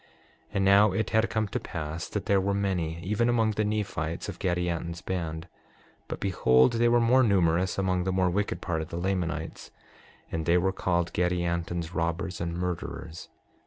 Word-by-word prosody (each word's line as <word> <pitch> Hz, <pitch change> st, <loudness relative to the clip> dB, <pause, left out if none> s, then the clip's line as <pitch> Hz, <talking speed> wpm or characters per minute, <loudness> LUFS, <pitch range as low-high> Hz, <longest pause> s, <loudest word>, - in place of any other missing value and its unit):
And 95 Hz, 0 st, 0 dB
now 100 Hz, +1 st, +6 dB
it 110 Hz, +3 st, -1 dB
had 110 Hz, +1 st, +3 dB
come 110 Hz, -1 st, 0 dB
to -, -, -2 dB
pass 80 Hz, -1 st, -5 dB
that 105 Hz, -, -3 dB
there 100 Hz, -1 st, +3 dB
were 100 Hz, +1 st, 0 dB
many, 90 Hz, -5 st, -1 dB
even 105 Hz, +5 st, +1 dB
among 115 Hz, -2 st, +2 dB
the 105 Hz, 0 st, -1 dB
Nephites, 100 Hz, -6 st, -2 dB
of -, -, -7 dB
Gadianton's 85 Hz, -1 st, -2 dB
band. 80 Hz, -2 st, -4 dB, 0.6 s
But -, -, -5 dB
behold, 65 Hz, -9 st, +3 dB
they 120 Hz, +1 st, +3 dB
were 120 Hz, 0 st, +4 dB
more 120 Hz, +3 st, +4 dB
numerous 90 Hz, -5 st, +2 dB
among 90 Hz, -2 st, 0 dB
the 95 Hz, -, 0 dB
more 90 Hz, -1 st, +2 dB
wicked 100 Hz, +3 st, -1 dB
part 80 Hz, -3 st, -2 dB
of 80 Hz, -, -6 dB
the 85 Hz, -, -5 dB
Lamanites. 85 Hz, -3 st, -3 dB, 0.6 s
And 80 Hz, -1 st, -3 dB
they 85 Hz, +1 st, +5 dB
were 95 Hz, +2 st, +1 dB
called 85 Hz, -2 st, 0 dB
Gadianton's 85 Hz, -1 st, -1 dB
robbers 85 Hz, +2 st, -2 dB
and 85 Hz, 0 st, -2 dB
murderers. 90 Hz, -2 st, -5 dB
90 Hz, 175 wpm, -28 LUFS, 85-100 Hz, 0.6 s, now